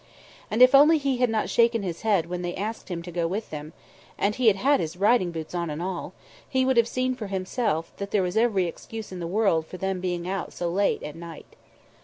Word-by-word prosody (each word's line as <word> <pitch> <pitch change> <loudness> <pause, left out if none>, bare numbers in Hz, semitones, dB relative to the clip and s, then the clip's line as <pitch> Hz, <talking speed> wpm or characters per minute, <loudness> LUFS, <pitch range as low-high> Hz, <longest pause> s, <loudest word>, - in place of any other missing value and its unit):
And 225 +4 +5
if 255 +1 +7
only 300 +4 +7
He 275 -3 0
had 250 -1 +2
not 220 -1 0
shaken 230 -2 +2
his 175 -3 -4
head 205 -7 +2
when 175 +1 -4
they 175 0 -3
asked 215 +2 -5
him 170 -2 -4
to 175 - -8
go 170 -1 -1
with 205 +6 -4
them 150 0 -6 0.5
and 205 - +1
He 250 +1 +1
had 210 - +6
had 275 +7 +3
his 160 +2 -4
riding 205 -2 +3
boots 160 -1 -6
on 170 -2 -2
and 150 +1 -4
all 180 0 -4 0.4
He 260 -1 +2
would 265 0 +2
have 230 -1 +5
seen 255 +1 -1
for 235 -5 -6
Himself 190 -2 -2
that 200 0 -5
there 200 -2 +2
was 180 +1 -2
every 220 -5 +2
excuse 220 +5 -7
in 185 - -6
the 170 - -4
world 180 -4 +1
for 185 - -8
them 190 0 -2
being 175 -1 -2
out 190 -1 -3
so 175 -1 -2
late 200 +3 +1
at 150 - -6
night. 165 -1 -11
195 Hz, 245 wpm, -26 LUFS, 175-230 Hz, 0.5 s, if